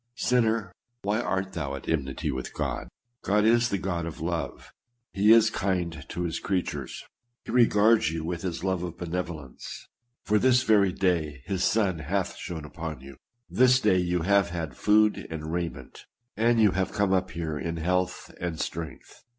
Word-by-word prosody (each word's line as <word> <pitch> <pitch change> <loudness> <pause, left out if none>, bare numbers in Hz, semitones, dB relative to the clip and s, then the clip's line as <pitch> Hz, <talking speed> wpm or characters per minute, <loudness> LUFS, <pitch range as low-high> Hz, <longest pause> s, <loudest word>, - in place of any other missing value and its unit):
Sinner! 115 -5 +1 0.3
why 105 +3 +1
art 95 -4 -2
thou 70 -4 -3
at - - -9
enmity 70 -5 -1
with 65 0 -5
God? - - -3 0.3
God 105 +1 +2
is 120 +1 +4
the 100 - 0
God 90 -3 -2
of 80 - -7
love; - - -4 0.4
he 105 +2 +4
is 115 0 +6
kind 90 -5 -2
to 90 - -3
his 85 -2 -2
creatures; 95 -3 -3 0.4
he - - -5
regards 115 -5 +4
you 80 -1 -4
with 85 0 -3
his 85 -2 -4
love 95 -2 0
of 85 -2 -5
benevolence; 85 -6 -6 0.4
for 105 0 +2
this 130 +1 +4
very 100 -3 +4
day 80 -7 0
his 95 -2 -1
sun 100 -6 +2
hath - - -2
shone 80 -3 -6
upon 80 -3 -6
you, 70 0 -11 0.3
this 125 0 +4
day 105 -6 +3
you 90 -1 0
have 100 0 +3
had 80 -6 -4
food 105 +4 +3
and 80 -1 -5
raiment, 85 -2 -5 0.3
and 115 +1 +3
you 105 -3 +5
have 95 0 -1
come 100 -2 +1
up 95 -1 +1
here 80 -1 -4
in 85 +1 -3
health 90 +2 -1
and 85 -2 -3
strength. 80 -2 -6
90 Hz, 175 wpm, -27 LUFS, 80-105 Hz, 0.4 s, is